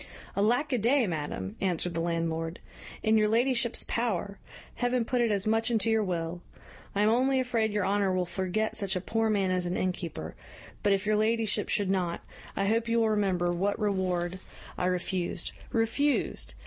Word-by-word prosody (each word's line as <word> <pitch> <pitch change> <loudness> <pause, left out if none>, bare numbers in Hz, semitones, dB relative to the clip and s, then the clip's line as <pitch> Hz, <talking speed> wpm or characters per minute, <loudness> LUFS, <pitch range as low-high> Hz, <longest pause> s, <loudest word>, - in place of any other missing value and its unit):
"Alack 245 +9 +2
a 250 - +2
day, 245 +4 +3
madam!" 145 - -4
answered 180 -2 0
the 165 - -2
landlord; 165 0 -2 0.4
"in 220 0 +4
your 215 - +3
ladyship's 235 +1 +1
power! 205 -4 -1 0.4
Heaven 245 -1 +1
put 250 +1 +1
it 235 -2 +2
as 200 -2 0
much 225 +1 +2
into 225 -1 +2
your 220 -1 +3
will! 175 -2 -3 0.5
I 200 - +2
am 210 - +4
only 260 +3 +3
afraid 230 -4 +1
your 205 -2 0
honour 200 0 +2
will 185 -1 +1
forget 190 +4 -1
such 200 -2 -1
a - - +1
poor 225 +4 0
man 195 -3 +1
as 180 -1 0
an 175 - -1
innkeeper; 180 -2 -3 0.5
but, 205 - +2
if 195 0 +1
your 215 0 +2
ladyship 220 -1 +1
should 200 -2 +1
not, 180 -3 -1 0.3
I 195 - 0
hope 225 +3 +1
you 230 0 +3
will 225 -1 +3
remember 185 -4 +1
what 195 +4 0
reward 185 -3 -1 0.4
I 180 - 0
refused 180 -1 -1 0.2
refused! 230 +6 0
205 Hz, 180 wpm, -29 LUFS, 180-225 Hz, 0.5 s, in